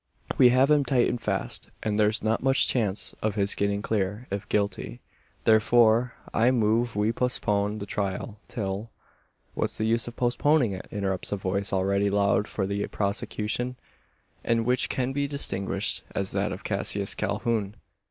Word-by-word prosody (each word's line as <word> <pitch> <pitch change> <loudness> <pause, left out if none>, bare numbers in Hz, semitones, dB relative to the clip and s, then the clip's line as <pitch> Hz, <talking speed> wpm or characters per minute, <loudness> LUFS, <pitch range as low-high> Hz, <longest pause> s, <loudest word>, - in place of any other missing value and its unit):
We 125 - +8
have 130 +4 +4
him 150 -1 +5
tight 125 -2 +2
and 120 - -3
fast; 100 -2 -1
and 105 -1 0
there's 105 +1 +2
not 110 +1 +1
much 135 +1 +3
chance 105 -5 0
of 110 -1 -1
his 100 -1 +3
getting 100 0 -1
clear 105 +2 -1
if 100 +2 -4
guilty. 100 -11 -1 0.4
Therefore, 115 +2 +4 0.2
I 115 +3 +4
move 115 -1 +1
we 105 +2 +2
postpone 105 -4 0
the 100 - -5
trial, 100 +1 -3
till 100 0 -4 0.3
" - - -43
"What's - - -2
the 110 - -1
use 115 +1 +1
of 120 - -7
postponing 125 0 +2
it?" 95 -1 -7
interrupts 95 -3 -3
a 100 - 0
voice 100 +1 -1
already 100 +1 +1
loud 100 0 +2
for 95 - -2
the 100 +1 -2
prosecution, 105 +4 -2 0.7
and 115 -1 +1
which 125 +1 +2
can 130 0 -1
be 140 +1 0
distinguished 100 -9 -1
as 100 -1 -1
that 100 +1 -1
of 95 - -7
Cassius 100 0 -1
Calhoun. 110 -2 -2
105 Hz, 165 wpm, -26 LUFS, 100-120 Hz, 0.7 s, We